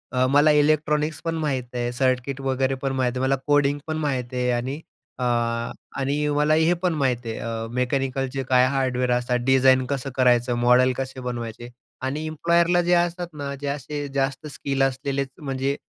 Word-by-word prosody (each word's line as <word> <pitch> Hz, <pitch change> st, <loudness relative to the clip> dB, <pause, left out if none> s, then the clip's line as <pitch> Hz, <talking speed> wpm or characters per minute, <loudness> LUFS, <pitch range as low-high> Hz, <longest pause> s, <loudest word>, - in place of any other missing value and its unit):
अ, 125 Hz, 0 st, +3 dB
मला 145 Hz, +3 st, +5 dB
इलेक्ट्रॉनिक्स 150 Hz, +1 st, +2 dB
पण 165 Hz, 0 st, -1 dB
माहीत 145 Hz, -5 st, -1 dB
आहे, 120 Hz, 0 st, -2 dB
सर्किट 130 Hz, +1 st, 0 dB
वगैरे 135 Hz, 0 st, 0 dB
पण 135 Hz, -, -1 dB
माहीत 130 Hz, -2 st, +1 dB
आहे, -, -, -2 dB
मला 130 Hz, +1 st, +2 dB
कोडिंग 145 Hz, 0 st, +3 dB
पण 155 Hz, -, -2 dB
माहीत 130 Hz, -5 st, -2 dB
आहे 125 Hz, 0 st, 0 dB
आणि 125 Hz, +4 st, -2 dB, 0.4 s
अ, -, -, -2 dB, 0.7 s
आणि 140 Hz, +2 st, 0 dB
मला 150 Hz, +1 st, +3 dB
हे 160 Hz, +2 st, +4 dB
पण 180 Hz, -2 st, +2 dB
माहीत 130 Hz, -5 st, 0 dB
आहे, 115 Hz, -1 st, -4 dB
अ, 115 Hz, 0 st, -4 dB
मेकॅनिकलचे 135 Hz, +1 st, -1 dB
काय 125 Hz, 0 st, +5 dB
हार्डवेअर 130 Hz, -2 st, 0 dB
असतात, 125 Hz, 0 st, +1 dB
डिझाईन 130 Hz, -1 st, +4 dB
कसं 135 Hz, 0 st, -3 dB
करायचं, 125 Hz, -1 st, +3 dB
मॉडेल 125 Hz, +1 st, +4 dB
कसे 135 Hz, 0 st, -4 dB
बनवायचे. 120 Hz, -1 st, -5 dB, 0.3 s
आणि 140 Hz, +4 st, -3 dB
इम्प्लॉयरला 170 Hz, +3 st, +2 dB
जे 175 Hz, +1 st, +1 dB
असतात 175 Hz, 0 st, +1 dB
ना, 140 Hz, -2 st, -5 dB
जे 140 Hz, +1 st, -6 dB
असे 145 Hz, +1 st, -4 dB
जास्त 135 Hz, +1 st, -1 dB
स्किल 135 Hz, -1 st, -1 dB
असलेलेच 135 Hz, +1 st, -1 dB
म्हणजे 135 Hz, -1 st, -2 dB
135 Hz, 175 wpm, -24 LUFS, 125-145 Hz, 0.7 s, मला